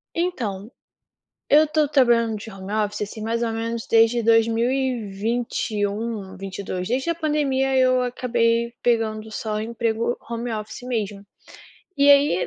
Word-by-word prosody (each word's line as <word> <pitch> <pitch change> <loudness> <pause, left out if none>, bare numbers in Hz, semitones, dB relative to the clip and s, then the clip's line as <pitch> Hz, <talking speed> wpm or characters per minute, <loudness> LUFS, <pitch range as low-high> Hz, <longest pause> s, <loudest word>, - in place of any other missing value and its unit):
Então, 235 - -2 0.8
eu 305 +2 +6
estou 305 -1 +1
trabalhando 235 -5 +3
de 215 +2 -8
home 195 0 -8
office, 210 -1 -1
assim, 215 +1 -6
mais 230 +2 -1
ou 225 -1 0
menos 230 0 -3
desde 230 +1 +4
dois 225 0 +5
mil 230 +2 +1
e 260 -5 -1
vinte 230 +5 -2
e 205 -1 0
um 210 -1 -5
vinte 195 0 -7
e - - -3
dois. 185 -1 -4
Desde 260 +5 -1
a - - +1
pandemia, 285 -4 0
eu 255 -1 +4
acabei 235 -1 0
pegando 220 -2 0
só 215 0 -3
emprego 230 +1 -1
home 235 0 -3
office 215 +2 -6
mesmo. 210 -5 -3 0.7
E 285 0 +5
aí, 280 -11 +4
230 Hz, 165 wpm, -23 LUFS, 215-250 Hz, 0.8 s, eu